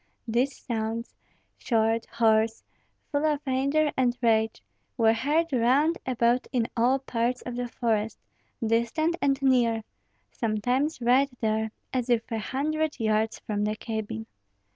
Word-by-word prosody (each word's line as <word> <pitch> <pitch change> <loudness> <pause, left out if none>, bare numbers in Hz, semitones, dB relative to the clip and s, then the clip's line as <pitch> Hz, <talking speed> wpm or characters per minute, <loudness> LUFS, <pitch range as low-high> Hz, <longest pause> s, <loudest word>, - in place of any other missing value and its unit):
These 245 +5 0
sounds, 230 0 -3 0.5
short, 225 -1 +1
hoarse, 220 -1 +2 0.5
full 290 0 0
of 300 -2 +2
anger 280 +3 +1
and 250 -1 +1
rage, 225 -2 +1 0.3
were 225 -2 +5
heard 295 +7 0
round 265 +7 +3
about 240 0 +2
in 240 -3 +1
all 245 +3 +3
parts 245 -1 -2
of 245 - -5
the 245 0 -2
forest, 225 -2 -1 0.5
distant 235 +9 +1
and 275 -1 +2
near, 235 -4 +3 0.5
sometimes 245 +7 -1
right 255 +4 +4
there, 220 0 0 0.2
as 255 -1 -1
if 235 -2 +3
a 225 - -1
hundred 300 +6 -1
yards 220 0 +1
from 210 -1 -1
the 210 +1 0
cabin. 215 - -4
240 Hz, 135 wpm, -27 LUFS, 225-270 Hz, 0.5 s, were